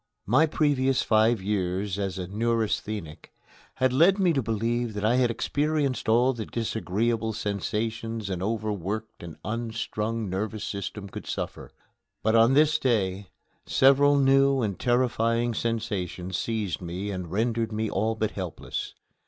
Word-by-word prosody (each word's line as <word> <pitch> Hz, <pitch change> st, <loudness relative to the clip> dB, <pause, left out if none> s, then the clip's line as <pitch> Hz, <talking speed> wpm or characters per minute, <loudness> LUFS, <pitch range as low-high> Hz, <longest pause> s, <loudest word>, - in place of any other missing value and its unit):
My 130 Hz, +10 st, +4 dB
previous 135 Hz, -4 st, +2 dB
five 110 Hz, -1 st, +3 dB
years 95 Hz, 0 st, -1 dB
as 95 Hz, -1 st, -2 dB
a 90 Hz, -, -3 dB
neurasthenic 105 Hz, -4 st, -2 dB, 0.4 s
had 130 Hz, -1 st, +1 dB
led 170 Hz, +8 st, +5 dB
me 185 Hz, -4 st, +3 dB
to 135 Hz, -, +1 dB
believe 115 Hz, 0 st, -1 dB
that 105 Hz, 0 st, -2 dB
I 120 Hz, +3 st, +3 dB
had 125 Hz, -2 st, +3 dB
experienced 145 Hz, +1 st, -1 dB
all 120 Hz, +4 st, +4 dB
the 115 Hz, -3 st, -6 dB
disagreeable 110 Hz, 0 st, -1 dB
sensations 110 Hz, +1 st, -3 dB
an 95 Hz, -2 st, -3 dB
overworked 110 Hz, 0 st, -3 dB
and 85 Hz, -3 st, -9 dB
unstrung 115 Hz, 0 st, -3 dB
nervous 105 Hz, +3 st, -3 dB
system 100 Hz, 0 st, -5 dB
could -, -, -9 dB
suffer. -, -, -5 dB, 0.5 s
But 110 Hz, -, +2 dB
on 115 Hz, +3 st, +5 dB
this 155 Hz, +1 st, +4 dB
day 100 Hz, -6 st, 0 dB, 0.4 s
several 140 Hz, +2 st, +5 dB
new 135 Hz, -1 st, +4 dB
and 100 Hz, -4 st, -2 dB
terrifying 120 Hz, -1 st, +1 dB
sensations 100 Hz, -6 st, -3 dB
seized 105 Hz, -4 st, -2 dB
me 90 Hz, +4 st, -4 dB
and 90 Hz, -3 st, -5 dB
rendered 115 Hz, +2 st, 0 dB
me 110 Hz, +1 st, -1 dB
all 110 Hz, +3 st, 0 dB
but 110 Hz, -1 st, -1 dB
helpless. 90 Hz, -4 st, -5 dB
110 Hz, 140 wpm, -26 LUFS, 100-120 Hz, 0.5 s, led